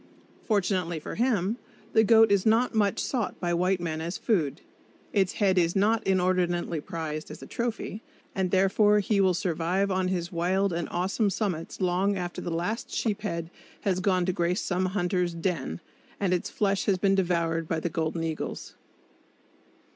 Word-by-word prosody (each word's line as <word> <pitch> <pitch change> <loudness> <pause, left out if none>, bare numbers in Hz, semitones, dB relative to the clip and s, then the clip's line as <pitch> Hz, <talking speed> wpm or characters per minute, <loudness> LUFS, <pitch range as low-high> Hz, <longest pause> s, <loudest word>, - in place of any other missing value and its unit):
Fortunately 185 -5 0
for - - -7
him, 225 -3 +1 0.4
the 220 - +6
goat 225 -1 +6
is 200 -2 +3
not 225 +3 +3
much 205 -3 +2
sought 235 -7 -2
by 175 -1 -1
white 180 +2 +1
men 160 -2 -3
as 170 +3 -3
food; 165 - 0 0.5
its 190 -3 +2
head 190 -3 +2
is 170 0 +1
not 215 +3 +3
inordinately 180 -3 +1
prized 155 -3 -5
as - - -9
a - - -7
trophy, 230 -2 -3 0.3
and 190 -1 0
therefore 200 +3 +4
he 205 0 +2
will 185 -2 +3
survive 180 +3 0
on 185 0 +1
his 180 -1 -2
wild 185 +2 +1
and 170 -1 -2
awesome 190 +4 0
summits 190 -5 -3
long 190 +2 +1
after 175 -1 -4
the - - -4
last 175 +7 -2
sheep 215 -2 -1
head 170 -5 -4 0.3
has 185 -2 0
gone 185 -2 +2
to 185 - 0
grace 175 +1 0
some 185 0 0
hunter's 180 -2 0
"den," 165 - -2 0.4
and 190 -3 +1
its 180 - -1
flesh 200 -2 0
has 195 -2 +2
been 195 +1 +2
devoured 170 -3 0
by 160 - -1
the 165 - -2
golden 165 -1 -2
eagles. 160 -1 -4
185 Hz, 170 wpm, -27 LUFS, 170-200 Hz, 0.5 s, the